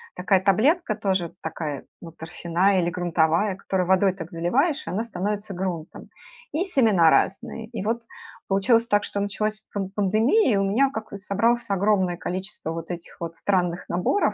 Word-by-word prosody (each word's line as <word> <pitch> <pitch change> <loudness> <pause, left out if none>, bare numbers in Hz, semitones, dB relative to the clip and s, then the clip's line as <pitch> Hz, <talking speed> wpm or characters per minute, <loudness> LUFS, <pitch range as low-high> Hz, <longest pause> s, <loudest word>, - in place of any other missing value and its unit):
такая 190 +1 +2
таблетка, 215 - +2
тоже 190 -5 -1
такая, 155 -3 -5 0.2
ну, 165 - -9
торфяная 175 +4 0
или 170 - 0
грунтовая, 175 +2 +1
которую 190 -1 -1
водой 190 0 +4
так 170 -3 -8
заливаешь, 270 - 0
и - - -2
она 210 +5 -1
становится 205 -1 -3
грунтом. 175 -3 -5 0.4
И 315 +4 +1
семена 220 - +4
разные. 220 +3 0
И 225 -4 -5
вот 230 +2 0 0.5
получилось 225 +4 +3
так, 205 -1 +2
что 205 - -3
началась 215 +2 -2
пан 195 -2 -3
пандемия, 215 - +3
и - - +2
у 195 - +2
меня 230 +8 +3
как 220 -4 -7
вот 200 - -6
собралось 225 +5 +1
огромное 195 -2 +2
количество 185 -1 -4
вот 165 0 -6
этих 175 -1 -7
вот 165 -1 -5
странных 180 -3 0
наборов. 180 - +1
195 Hz, 165 wpm, -24 LUFS, 175-215 Hz, 0.5 s, водой